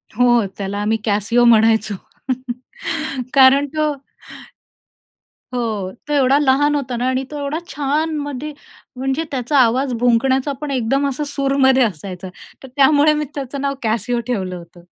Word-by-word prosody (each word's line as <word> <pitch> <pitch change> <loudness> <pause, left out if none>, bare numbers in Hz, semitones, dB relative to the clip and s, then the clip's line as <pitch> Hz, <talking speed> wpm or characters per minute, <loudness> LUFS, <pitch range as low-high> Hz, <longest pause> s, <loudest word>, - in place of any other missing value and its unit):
हो, 240 -1 +4
त्याला 200 0 -4
आम्ही 215 +2 +1
कॅसीओ 215 +3 +2
म्हणायचो. 220 -2 +4 1.4
कारण 275 +1 +6
तो 305 -1 +1 1.6
हो, 220 -6 -2 0.2
तो 295 - -2
एवढा 275 -1 +4
लहान 290 +1 +3
होता 260 -4 -2
ना 245 +2 -1
आणि 260 +1 -1
तो 300 - -5
एवढा 285 +3 -2
छान 300 +3 -1
मध्ये 290 +1 -5 0.4
म्हणजे 265 +4 -1
त्याचा 270 +2 -1
आवाज 255 +2 +2
भुंकण्याचा 260 +3 +2
पण 300 -2 -4
एकदम 270 +2 0
असं 275 +2 -3
सूरमध्ये 275 -2 +2
असायचा, 185 -2 -4 0.3
तर - - -9
त्यामुळे 290 +2 +5
मी 300 0 -1
त्याचं 275 -1 -5
नाव 280 0 0
कॅसिओ 230 +2 0
ठेवलं 190 -7 -2
होतं. 170 0 -14
260 Hz, 140 wpm, -19 LUFS, 225-280 Hz, 1.6 s, कारण